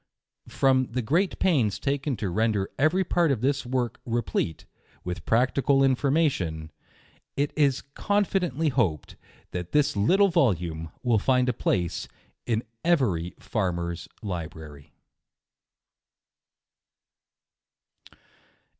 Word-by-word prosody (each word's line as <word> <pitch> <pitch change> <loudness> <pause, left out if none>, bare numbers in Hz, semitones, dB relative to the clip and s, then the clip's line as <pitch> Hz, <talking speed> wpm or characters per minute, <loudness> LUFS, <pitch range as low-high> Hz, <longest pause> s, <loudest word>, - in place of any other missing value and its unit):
From 130 -1 +2
the 125 +1 -2
great 170 - +1
pains 130 - +2
taken 140 -2 -1
to 100 -4 -3
render 105 -1 0
every 160 +7 +3
part 170 -3 +2
of 125 -5 -1
this 135 0 0
work 125 -2 -2
replete 110 -9 -2 0.4
with 90 0 -6
practical 135 +3 +3
information, 130 - +1 0.7
it 145 +1 0
is 140 -3 +2
confidently 180 -7 0
hoped 110 - -1 0.4
that 90 -1 -5
this 150 -6 +3
little 190 - +4
volume 85 - 0
will 120 -4 +3
find 125 +3 +2
a - - +1
place 90 -6 -1 0.4
in 115 -1 0 0.2
every 115 - +1
far* 95 -5 -1
mer's 85 -1 -4 0.2
library. 80 -6 -7
125 Hz, 105 wpm, -26 LUFS, 90-145 Hz, 0.7 s, little